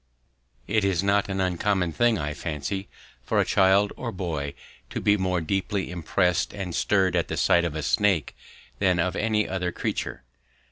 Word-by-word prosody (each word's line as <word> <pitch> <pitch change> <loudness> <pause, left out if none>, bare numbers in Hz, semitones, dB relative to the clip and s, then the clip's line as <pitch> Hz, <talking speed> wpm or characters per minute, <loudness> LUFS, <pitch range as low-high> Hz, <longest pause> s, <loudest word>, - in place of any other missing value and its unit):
It 110 0 +1
is 95 -2 +1
not 100 0 +2
an 95 0 -2
uncommon 95 0 0
thing, 120 +2 +3
I 75 -2 -3
fancy, 80 +6 -4 0.3
for - - 0
a - - +3
child 100 +1 +3
or - - -4
boy 80 -7 -4 0.3
to - - -4
be 100 - +3
more 95 -3 0
deeply 95 +2 -2
impressed 90 +2 0
and 95 -4 -4
stirred 95 -2 +2
at - - +1
the - - -4
sight 85 0 +3
of 80 -3 -3
a 80 - -3
snake 95 +3 +1 0.4
than 90 -2 +3
of 90 +1 0
any 105 -1 +1
other 90 -1 -2
creature. - - -3
95 Hz, 175 wpm, -25 LUFS, 85-100 Hz, 0.4 s, thing